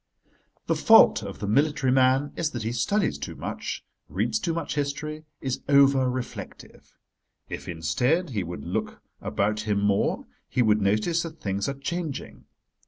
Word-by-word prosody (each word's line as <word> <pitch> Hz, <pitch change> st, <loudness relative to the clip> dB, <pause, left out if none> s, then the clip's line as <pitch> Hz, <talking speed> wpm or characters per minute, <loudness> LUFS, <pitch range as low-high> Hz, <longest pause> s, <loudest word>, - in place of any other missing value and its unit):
The -, -, +1 dB
fault -, -, +6 dB
of -, -, -7 dB
the 100 Hz, -, -4 dB
military 140 Hz, +3 st, +2 dB
man 130 Hz, +2 st, +3 dB
is 165 Hz, -2 st, 0 dB
that 120 Hz, -6 st, -5 dB
he 110 Hz, -, -1 dB
studies 195 Hz, -, 0 dB
too -, -, -6 dB
much, -, -, -5 dB, 0.2 s
reads 220 Hz, -, 0 dB
too 175 Hz, -, -1 dB
much 165 Hz, -2 st, -3 dB
history, 150 Hz, +2 st, -3 dB, 0.2 s
is 130 Hz, -2 st, -2 dB
over 140 Hz, -2 st, +5 dB
reflective. 125 Hz, 0 st, -7 dB, 0.5 s
If, -, -, -6 dB
instead, 125 Hz, -, 0 dB
he 105 Hz, -5 st, -1 dB
would 85 Hz, -5 st, -6 dB
look -, -, -3 dB, 0.2 s
about 105 Hz, +2 st, 0 dB
him 105 Hz, -2 st, 0 dB
more 100 Hz, 0 st, +1 dB, 0.2 s
he 125 Hz, -, +2 dB
would 105 Hz, -1 st, +3 dB
notice 105 Hz, -, +2 dB
that 165 Hz, -2 st, -7 dB
things 100 Hz, -3 st, -2 dB
are 140 Hz, -, -3 dB
changing. 155 Hz, +1 st, -5 dB
130 Hz, 160 wpm, -26 LUFS, 105-150 Hz, 0.5 s, fault